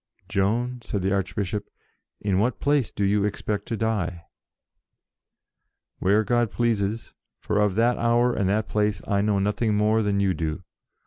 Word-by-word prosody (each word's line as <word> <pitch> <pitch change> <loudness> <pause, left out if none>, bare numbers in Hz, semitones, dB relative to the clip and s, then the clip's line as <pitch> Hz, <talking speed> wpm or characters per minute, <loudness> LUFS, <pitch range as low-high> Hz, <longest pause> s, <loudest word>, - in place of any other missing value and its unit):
"Joan," 115 +5 0
said 100 -4 -3
the 95 +1 +1
Archbishop, 100 +1 -2 0.5
"in 100 -2 0
what 120 +4 0
place 145 -5 +2
do 100 - -2
you 100 +1 +2
expect 105 0 -2
to 115 - -2
die?" 100 -7 -2 1.7
"Where 105 +3 +3
God 120 0 +1
pleases, 115 -2 -1 0.3
for 105 -1 -1
of 105 -3 +2
that 120 +2 +2
hour 120 +1 +3
and 100 -5 0
that 105 +2 0
place 105 -2 0
I 100 -1 +2
know 105 -1 +1
nothing 105 +2 0
more 110 +1 +3
than 100 -1 0
you 100 -2 +2
do. 80 +2 -3
105 Hz, 155 wpm, -25 LUFS, 100-115 Hz, 1.7 s, Where